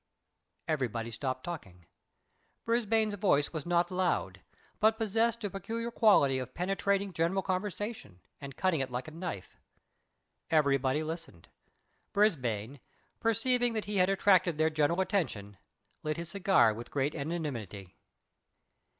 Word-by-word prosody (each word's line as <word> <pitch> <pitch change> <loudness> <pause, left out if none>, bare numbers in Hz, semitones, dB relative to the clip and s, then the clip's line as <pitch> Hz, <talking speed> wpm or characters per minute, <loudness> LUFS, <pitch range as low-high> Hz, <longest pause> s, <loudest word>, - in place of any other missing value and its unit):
Everybody 120 -7 -2
stopped 130 +2 -3
talking. 95 - -8 0.8
Brisbane's 225 -2 +2
voice 180 -8 +1
was 155 -1 -4
not 175 +1 +2
loud, 185 -1 -1 0.4
but 220 +1 +4
possessed 225 +1 +1
a 205 - -1
peculiar 230 +5 -4
quality 145 - +4
of 125 -1 -7
penetrating 195 +2 0
general 175 +4 0
conversation, 190 - -4 0.2
and 140 -1 -9
cutting 185 -5 +1
it 135 -1 -1
like 125 +4 -4
a - - -8
knife. 165 - -6 0.9
Everybody 140 -2 +2
listened. 160 - -7 0.6
Brisbane, 130 - +1 0.4
perceiving 240 +1 +2
that 220 -1 -2
he 205 -1 -2
had 185 0 +4
attracted 185 -4 +3
their 160 +1 +2
general 155 +4 +2
attention, 115 - -2 0.4
lit 155 +1 -2
his 170 0 -5
cigar 185 - +4
with 115 +2 -8
great 145 +1 -1
equanimity. 140 - -5
170 Hz, 125 wpm, -31 LUFS, 135-200 Hz, 0.9 s, but